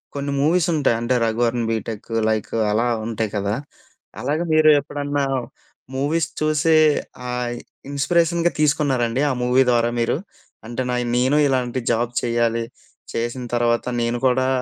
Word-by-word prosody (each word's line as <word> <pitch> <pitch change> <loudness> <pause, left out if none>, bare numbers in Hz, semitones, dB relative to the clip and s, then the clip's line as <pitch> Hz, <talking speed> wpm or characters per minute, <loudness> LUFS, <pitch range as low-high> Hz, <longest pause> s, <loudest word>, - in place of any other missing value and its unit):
కొన్ని 140 0 -3
మూవీస్ 165 +3 +2
ఉంటాయి. 140 -6 +2
అంటే 120 +2 +1
'రఘువరన్ 115 +1 0
బీటెక్' 110 0 -4 0.2
లైక్ 110 -1 -1 0.2
అలా 115 +3 +1 0.2
ఉంటాయి 110 -1 -2
కదా! 100 +1 -1 0.7
అలాగ 150 +2 -1
మీరు 155 0 +6
ఎప్పుడన్నా 145 0 -3 0.7
మూవీస్ 155 +4 0
చూసే 155 +1 +3 0.6
ఆయ్, 120 -1 -3 0.3
ఇన్‌‌స్పీరేషన్‌గా 170 +4 +1
తీసుకున్నారండి? 135 -5 +1
ఆ - - +1
మూవీ 125 +2 +4
ద్వారా 120 0 +2
మీరు? 115 - +1 0.5
అంటే 120 +2 -3
నా 125 - 0
య్ 120 - -3
నేను 130 +4 +3
ఇలాంటి 130 -1 0
జాబ్ 120 +1 0
చేయాలి. 115 -1 +1 0.5
చేసిన 120 +2 -3
తర్వాత 120 0 +1 0.2
నేను 120 +1 0
కూడా 130 +1 +2
125 Hz, 135 wpm, -21 LUFS, 115-145 Hz, 0.7 s, మీరు